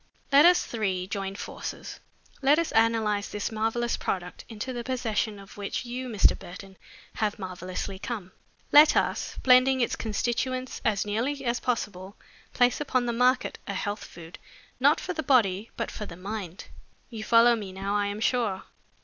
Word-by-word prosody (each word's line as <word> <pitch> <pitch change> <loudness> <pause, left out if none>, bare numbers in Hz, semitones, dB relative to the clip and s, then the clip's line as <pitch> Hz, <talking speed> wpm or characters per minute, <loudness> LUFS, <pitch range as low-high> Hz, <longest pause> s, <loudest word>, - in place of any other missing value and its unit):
Let 285 +3 +7
us 360 0 +4
three 195 -5 -2
join 195 0 -4
forces. - - -7 0.4
Let 285 +2 +5
us 335 -1 0
analyze 220 -2 +2
this 210 +2 -3
marvelous 225 +2 -1
product, 180 -1 -4
into 225 +3 -5
the 240 -1 -4
possession 230 -4 -1
of 195 0 -13
which 200 +5 -4
you, 250 +1 -5
Mr. 210 -4 +4
Burton, 190 +2 -11 0.4
have 215 -1 0
so 205 - -8
mysteriously 185 +1 -5
come. 205 -5 -5 0.4
Let 300 +1 +8
us, - - -1
blending 260 +1 +5
its 240 - +1
constituents 245 +4 -2
as 210 -2 +1
nearly 255 +7 -2
as 240 0 0
possible, 205 -5 -3 0.4
place 245 +3 +2
upon 255 -4 0
the 235 - -1
market 250 +2 +2
a 200 - -3
health 205 +2 -3
food 170 0 -11 0.4
not - - +4
for - - -4
the 315 - -2
body 225 -7 +2
but - - -3
for 210 - -6
the 170 - -10
mind. 195 -2 -6 0.5
You 220 -2 -6
follow 235 +1 +5
me 205 -4 -6
now, 195 +2 -3
I 205 -1 +1
am 205 +1 -4
sure? 225 -6 0
220 Hz, 170 wpm, -27 LUFS, 195-250 Hz, 0.5 s, Let